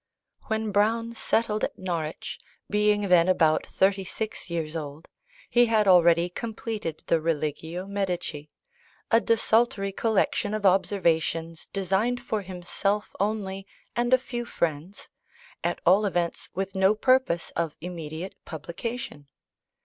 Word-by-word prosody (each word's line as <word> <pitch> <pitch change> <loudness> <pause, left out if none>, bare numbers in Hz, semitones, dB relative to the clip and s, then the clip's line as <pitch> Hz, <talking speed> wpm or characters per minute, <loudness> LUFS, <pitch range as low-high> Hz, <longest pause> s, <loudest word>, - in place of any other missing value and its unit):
When 220 -1 -1
Browne 225 +3 +1
settled 225 -2 0
at - - -2
Norwich, 170 -4 -4 0.3
being 210 0 +2
then 175 -2 +5
about 160 -4 +3
thirty 195 0 +2
six 215 +1 -5
years 165 -2 -3
old, 150 0 -6 0.4
he 240 0 +4
had 215 -2 +3
already 170 -2 +6
completed 215 -3 -5
the 165 - +2
Religio 160 +2 -2
Medici; 180 -7 -3 0.6
a 230 0 +6
desultory 225 -3 +2
collection 215 0 +1
of 215 -1 -3
observations 165 -4 +1
designed 195 +6 0
for 225 -3 -2
himself 190 +3 -2
only 195 -1 -2 0.3
and 240 +1 +1
a 255 - +8
few 245 -2 -5
friends, 170 -2 -3 0.6
at - - -1
all 195 +4 +5
events 175 -3 -2
with 195 +1 -2
no 190 +2 +4
purpose 255 -7 +2
of 165 -3 -2
immediate 165 +1 -6
publication. 170 - -6
190 Hz, 125 wpm, -26 LUFS, 170-215 Hz, 0.6 s, a